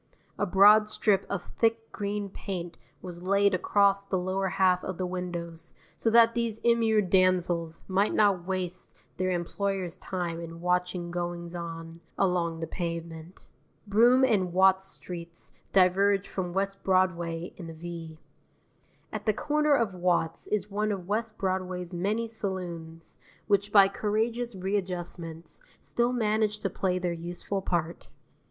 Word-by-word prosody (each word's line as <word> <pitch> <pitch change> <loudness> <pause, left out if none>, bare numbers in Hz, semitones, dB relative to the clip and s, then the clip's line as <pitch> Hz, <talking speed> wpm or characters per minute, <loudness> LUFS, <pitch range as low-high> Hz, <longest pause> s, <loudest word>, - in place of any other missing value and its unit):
A 205 - +1
broad 210 +3 +6
strip 205 -2 +2
of 200 -3 -2
thick 225 0 -1
green 205 0 -3
paint 180 -3 -6 0.3
was 175 -2 -8
laid 200 +2 +3
across 200 +1 +3
the 195 -1 -1
lower 185 +1 -1
half 185 -1 +2
of 185 -2 -4
the 185 - -2
windows 170 -2 -5 0.2
so 225 - 0
that 230 0 +6
these 230 -2 -1
immured 225 -4 +3
damsels 175 -3 +2
might 195 +2 +2
not 195 -4 +3
waste 185 -1 -4 0.2
their 185 0 0
employers' 185 0 -2
time 175 -3 -3
in 165 0 -8
watching 180 0 -1
goings 175 -1 -4
on 165 -1 -7 0.2
along 170 -3 0
the - - -1
pavement. 170 0 -6 0.4
Broome 240 +6 +5
and 195 -8 +1
Watts 190 +1 +4
streets 170 -3 -7 0.2
diverge 195 +1 +3
from 180 -2 -4
West 195 +1 -2
Broadway 175 -3 0
in 170 -3 -8
a - - -7
V. 165 -1 -8 1.0
At - - -5
the 215 - +4
corner 300 +2 +2
of 230 -7 0
Watts 175 -2 0
is 210 -1 -1
one 210 +1 0
of 190 -3 -4
West 220 +2 -2
Broadway's 185 -2 -2
many 205 +6 -1
saloons, 175 -7 -6 0.3
which 205 0 +1
by 200 -2 +8
courageous 225 +3 -1
readjustments 180 -4 -4 0.2
still 240 +1 0
manage 215 -3 +1
to 195 - -2
play 185 -1 0
their 180 -1 -1
useful 175 +3 -4
part. 170 -2 -2
185 Hz, 145 wpm, -28 LUFS, 175-205 Hz, 1.0 s, by